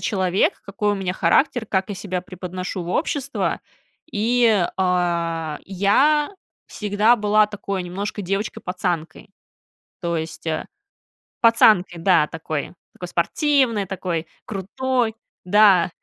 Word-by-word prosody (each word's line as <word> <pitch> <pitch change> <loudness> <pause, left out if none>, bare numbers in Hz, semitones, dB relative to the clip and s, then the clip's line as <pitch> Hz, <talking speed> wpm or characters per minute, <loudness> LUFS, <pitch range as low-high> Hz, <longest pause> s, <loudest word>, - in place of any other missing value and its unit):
человек, 190 -2 +1
какой 205 +1 -1
у - - 0
меня 190 -2 -2
характер, 245 +2 +2
как 190 -1 -1
я 205 - -4
себя 185 -1 -4
преподношу 185 0 -6
в 170 - -7
общество, 285 - -1 0.5
и, 225 -2 +3
э, 170 -4 0
я 265 - +2 0.4
всегда 210 +3 +2
была 210 0 +3
такой 200 -2 -4
немножко 200 +4 -4
девочкой-пацанкой, 180 -4 -3 0.7
то 170 -2 -1
есть, 160 +1 -6
а, 155 -1 -2 0.8
пацанкой, 215 -7 +4
да, 170 -4 +4
такой 160 0 -5 0.2
такой 180 - -8
спортивной, 245 - +1
такой 180 -3 -3 0.2
крутой, 230 +4 -1 0.3
да, 190 -2 +5
195 Hz, 110 wpm, -22 LUFS, 180-215 Hz, 0.8 s, да